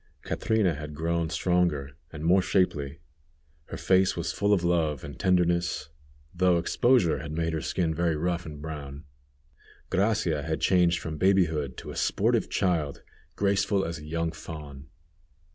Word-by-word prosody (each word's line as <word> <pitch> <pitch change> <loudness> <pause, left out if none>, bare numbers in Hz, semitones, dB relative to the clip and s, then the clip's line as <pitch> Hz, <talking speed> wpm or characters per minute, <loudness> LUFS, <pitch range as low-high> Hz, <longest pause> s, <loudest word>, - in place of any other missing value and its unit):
Catrina 110 -6 +1
had 75 0 -7
grown 85 +1 -1
stronger, 85 -5 0 0.2
and 75 -1 -7
more 90 +3 +5
shapely. 75 -7 0 0.7
Her - - -7
face 95 0 +3
was 85 -1 -2
full 100 +5 0
of 95 -4 +3
love 80 -5 +1
and 70 -3 -9
tenderness, 85 -4 +1 0.4
though 90 -1 +3
exposure 105 +2 +2
had 75 -1 -6
made 80 0 -1
her 80 - -2
skin 80 +3 -1
very 85 0 0
rough 85 +2 -1
and 75 -1 -8
brown. 75 -2 -7 0.9
Gracia 95 -6 +1
had - - -2
changed 90 -2 +3
from 80 -2 -6
babyhood 80 -8 +2
to - - -7
a - - -9
sportive - - +1
child, 80 -6 -1 0.3
graceful 100 0 +1
as 85 -1 -4
a 75 - -11
young 80 +1 -1
fawn. 75 -4 -9
85 Hz, 150 wpm, -27 LUFS, 75-90 Hz, 0.9 s, more